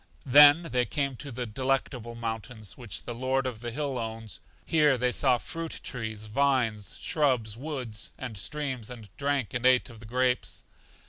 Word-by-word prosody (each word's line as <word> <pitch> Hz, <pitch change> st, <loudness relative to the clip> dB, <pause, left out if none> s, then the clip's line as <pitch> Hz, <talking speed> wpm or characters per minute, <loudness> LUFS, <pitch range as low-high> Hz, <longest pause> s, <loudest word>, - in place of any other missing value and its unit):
Then 145 Hz, +4 st, +8 dB
they 125 Hz, -2 st, +2 dB
came 140 Hz, 0 st, 0 dB
to 140 Hz, +2 st, -6 dB
The 125 Hz, +1 st, -3 dB
Delectable 125 Hz, 0 st, -1 dB
Mountains, 110 Hz, -2 st, -5 dB
which 120 Hz, -7 st, -5 dB
the 120 Hz, -, -5 dB
Lord 130 Hz, +2 st, 0 dB
of 125 Hz, -4 st, -3 dB
the 120 Hz, +1 st, -4 dB
Hill 135 Hz, +1 st, -2 dB
owns. 110 Hz, -4 st, -4 dB, 0.3 s
Here 150 Hz, -4 st, +4 dB
they 125 Hz, +1 st, +2 dB
saw 130 Hz, -1 st, +3 dB
fruit 165 Hz, +6 st, -5 dB
trees, 110 Hz, -4 st, -4 dB
vines, 115 Hz, -3 st, +1 dB
shrubs, 125 Hz, -8 st, +1 dB
woods, 125 Hz, -5 st, -5 dB
and 125 Hz, -4 st, -6 dB
streams, 130 Hz, +1 st, -2 dB
and 110 Hz, -4 st, -11 dB
drank 140 Hz, -3 st, -1 dB
and 120 Hz, -, -2 dB
ate 130 Hz, 0 st, +4 dB
of 115 Hz, -, -13 dB
the 110 Hz, -, -11 dB
grapes. 125 Hz, +2 st, 0 dB
125 Hz, 170 wpm, -28 LUFS, 110-135 Hz, 0.3 s, Then